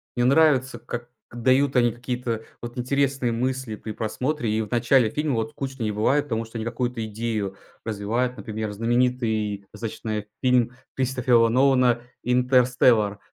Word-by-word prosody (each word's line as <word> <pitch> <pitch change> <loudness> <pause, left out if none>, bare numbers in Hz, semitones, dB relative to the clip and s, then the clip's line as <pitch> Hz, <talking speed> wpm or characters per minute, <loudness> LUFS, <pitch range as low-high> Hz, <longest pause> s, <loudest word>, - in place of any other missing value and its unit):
Мне 120 - +1
нравится, 135 -1 +3
как 120 0 -6 0.2
дают 130 +4 +2
они 120 -1 +4
какие-то 120 -1 -4 0.2
вот 120 +1 -7
интересные 135 -1 0
мысли 130 -1 -2
при 110 +1 -7
просмотре. 125 +5 -2
И 110 +1 +1
в 105 - -6
начале 120 0 +3
фильма 150 +1 -1
вот 110 0 -2
скучно 135 -3 -5
не 110 - 0
бывает, 130 +8 +2
потому 115 -4 -2
что 115 +1 -8
они 110 - -3
какую-то 120 0 -2
идею 110 -3 -3 0.3
развивают. 115 +4 -2
Например, 110 -1 -4
знаменитый 115 -2 0
достаточно 110 -1 -4 0.2
фильм 125 -2 +3 0.2
Кристофера 125 -3 +3
Нолана 125 -1 +3 0.2
"Интерстеллар" 125 -4 +3
120 Hz, 145 wpm, -24 LUFS, 110-130 Hz, 0.3 s, они